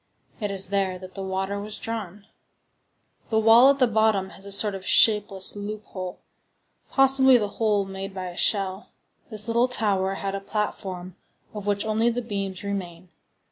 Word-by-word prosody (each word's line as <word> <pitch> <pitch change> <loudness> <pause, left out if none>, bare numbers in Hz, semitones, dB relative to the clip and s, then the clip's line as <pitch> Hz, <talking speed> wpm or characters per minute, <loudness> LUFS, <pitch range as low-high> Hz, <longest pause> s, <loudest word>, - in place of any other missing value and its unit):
It 210 -3 -2
is 195 -1 +1
there 195 -2 0
that 185 0 -11
the 195 - -7
water 190 +1 -3
was 210 +1 -7
drawn. 210 -3 -6 1.0
The 220 - +1
wall 225 +4 +7
at 280 - +3
the 260 - +4
bottom 220 -4 +1
has 195 - -11
a - - -8
sort 205 +1 +2
of 190 -1 -7
shapeless 205 -3 +3
loophole, 205 -3 -6 0.7
possibly 265 -1 +5
the 210 -3 -2
hole 210 -3 +2
made 195 0 -6
by 190 -1 -6
a 175 - -10
shell. 195 0 0 0.4
This 215 -1 -1
little 235 +2 +2
tower 195 -6 0
had 195 0 -4
a 195 - -4
platform, 190 -3 -4 0.4
of 205 -1 -7
which 205 +1 0
only 220 +2 +2
the 240 +1 -3
beams 195 -4 -4
remain. 185 -3 -5
200 Hz, 170 wpm, -25 LUFS, 190-220 Hz, 1.0 s, wall